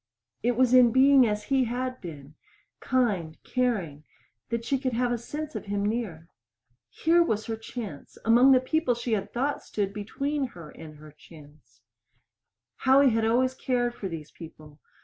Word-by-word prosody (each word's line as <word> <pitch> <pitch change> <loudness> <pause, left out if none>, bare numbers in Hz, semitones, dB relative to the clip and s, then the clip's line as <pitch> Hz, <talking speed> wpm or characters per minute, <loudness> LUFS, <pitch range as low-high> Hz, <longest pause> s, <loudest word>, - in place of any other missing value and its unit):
It 245 - +1
was 255 -1 +3
in 250 -2 +7
being 265 0 +6
as 210 0 -2
he 265 +1 +1
had 255 +2 -4
been 150 -4 -10 0.5
kind, 200 -11 -1
caring 200 - -2 0.5
that 235 0 -3
she 275 +2 0
could 255 -2 -2
have 245 +1 0
a 240 - 0
sense 300 +6 -6
of - - -5
him 200 0 -2
near. 205 -7 -3 0.6
Here 335 +2 +2
was 220 -10 0
her 225 - -3
chance 220 - -8
among 240 +4 +6
the 260 - +6
people 260 -1 0
she 240 0 -3
had 200 -3 -2
thought 275 +4 -1
stood 200 -2 -3
between 275 +7 -3
her 165 -3 -10
and 155 -1 -12
her 150 0 -14
chance. 150 -1 -18 1.0
Howie 270 0 +4
had 225 0 +1
always 255 +3 +2
cared 245 -2 -1
for 200 - -6
these 155 -3 -8
people. 155 -2 -13
235 Hz, 170 wpm, -27 LUFS, 180-255 Hz, 1.0 s, in